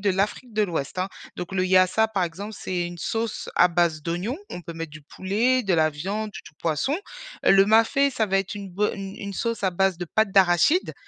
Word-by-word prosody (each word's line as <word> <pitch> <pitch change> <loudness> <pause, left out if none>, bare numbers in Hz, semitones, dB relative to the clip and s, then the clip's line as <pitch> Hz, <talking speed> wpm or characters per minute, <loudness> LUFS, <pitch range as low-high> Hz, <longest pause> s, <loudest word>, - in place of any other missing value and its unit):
de 205 - 0
l'Afrique 210 +5 -2
de 215 - +2
l'Ouest, 165 -3 -3
hein. 185 - 0 0.3
Donc, 180 +1 -6
le 185 -1 +1
yassa, 185 +4 +4
par 200 -4 0
exemple, 200 +6 -6
c'est 175 -2 -2
une 175 0 -8
sauce 225 +5 -3
à 180 - +6
base 170 -2 +1
d'oignons. 180 - -3
On 175 - -7
peut 170 - -7
mettre 165 -1 -6
du 155 - -11
poulet, 220 - 0
de 195 -4 +1
la 155 -1 +3
viande 200 +8 -3
ou - - -9
du - - -14
poisson. 170 - 0 0.5
Heu, - - +5
le 195 0 +6
mafé, 225 +6 +4
ça 230 -3 0
va 195 -2 +1
être 195 +1 -3
une 200 -2 -7
bo 205 +4 0
une 195 0 -7
une 200 -1 -6
sauce 230 -1 -2
à 190 - +2
base 190 0 +1
de 175 - -4
pâte 220 +4 +1
d'arachide, 195 - +4
195 Hz, 235 wpm, -24 LUFS, 175-215 Hz, 0.5 s, à